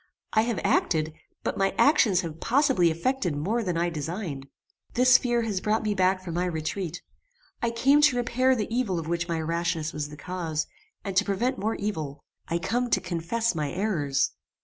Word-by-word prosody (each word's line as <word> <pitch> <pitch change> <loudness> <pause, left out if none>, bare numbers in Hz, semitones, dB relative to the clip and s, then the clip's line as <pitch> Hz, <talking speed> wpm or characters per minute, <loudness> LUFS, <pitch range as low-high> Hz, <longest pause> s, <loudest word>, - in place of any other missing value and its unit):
I 220 - +5
have 230 -1 -1
acted, 155 -2 +1 0.3
but - - -2
my 195 0 +1
actions 225 - +4
have 165 -3 -7
possibly 260 - +3
effected 175 - -1
more 200 +11 0
than 180 -6 -1
I 170 +1 +1
designed. 155 -2 -4 0.5
This 250 +1 +6
fear 240 -1 +1
has 205 -5 -2
brought 215 +1 +1
me 210 -1 +1
back 185 -1 +2
from 170 - -4
my 175 +2 0
retreat. 175 +1 -3 0.6
I 235 - +1
come 270 +6 +4
to 295 -4 +5
repair 250 +2 +2
the 225 0 -2
evil 225 -8 0
of 165 -2 -4
which 170 +1 -1
my 165 -2 -1
rashness 165 -1 -1
was 150 -1 -3
the 150 - -10
cause, 165 -1 -3 0.4
and 195 -2 -4
to 205 - +6
prevent 235 +7 -1
more 220 +3 -1
evil. 155 -9 -4 0.2
I 170 - 0
come 235 +8 -1
to - - +3
confess 185 +6 -1
my 150 -4 -2
errors." 155 -8 0
185 Hz, 190 wpm, -27 LUFS, 165-230 Hz, 0.6 s, This